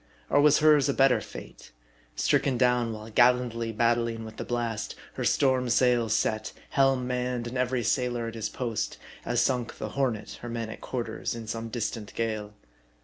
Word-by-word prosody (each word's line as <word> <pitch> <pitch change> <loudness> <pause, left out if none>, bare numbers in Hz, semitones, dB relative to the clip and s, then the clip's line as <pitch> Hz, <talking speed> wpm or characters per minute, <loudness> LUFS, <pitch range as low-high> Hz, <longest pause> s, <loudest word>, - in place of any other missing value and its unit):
Or 145 - +5
was 150 0 +6
hers 150 -2 +5
a 140 - +1
better 135 -1 +4
fate? - - -11 0.5
Stricken 130 - +2
down 125 -2 +2
while 110 0 -8
gallantly 120 -1 +3
battling 115 0 +1
with 110 0 -10
the - - -3
blast; 115 -4 -3 0.2
her - - -4
storm 130 -2 +2
sails 120 -2 +3
set; 110 -1 -1 0.2
helm 135 -2 +3
manned; 125 -1 -2
and 120 +2 -6
every 125 -1 0
sailor 120 0 0
at 115 - -6
his 110 -1 -3
post; 115 -3 -3 0.3
as 120 0 +1
sunk 125 -3 0
the - - -4
Hornet, 125 -6 -2
her 120 - -6
men 115 -1 -4
at - - -10
quarters, 115 -2 -3
in 115 -1 -7
some 115 +1 -4
distant 110 -2 -4
gale. 110 -2 -3
120 Hz, 175 wpm, -27 LUFS, 115-125 Hz, 0.5 s, was